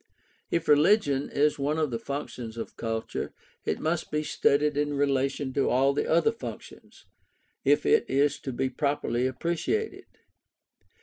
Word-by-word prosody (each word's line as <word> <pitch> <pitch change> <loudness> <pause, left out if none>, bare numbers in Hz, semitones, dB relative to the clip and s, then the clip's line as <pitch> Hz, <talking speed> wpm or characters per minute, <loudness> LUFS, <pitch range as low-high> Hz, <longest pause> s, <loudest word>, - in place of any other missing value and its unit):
If 170 -1 -1
religion 150 -2 +4
is 145 +1 +1
one 145 +3 0
of 155 -4 0
the 115 - -2
functions 125 -3 -6
of 115 - -6
culture, 115 -1 -4 0.3
it - - -1
must 160 +1 -1
be 150 0 -1
studied 150 0 +2
in 145 0 0
relation 140 -1 0
to 140 - +1
all 135 +2 +3
the 145 - -1
other 170 +7 +4
functions, 230 - -10 0.6
if - - +3
it 450 -1 +3
is 140 +1 +2
to 135 - -5
be 130 +2 -1
properly 130 -2 0
appreciated. 170 - -2
145 Hz, 145 wpm, -27 LUFS, 130-155 Hz, 0.6 s, religion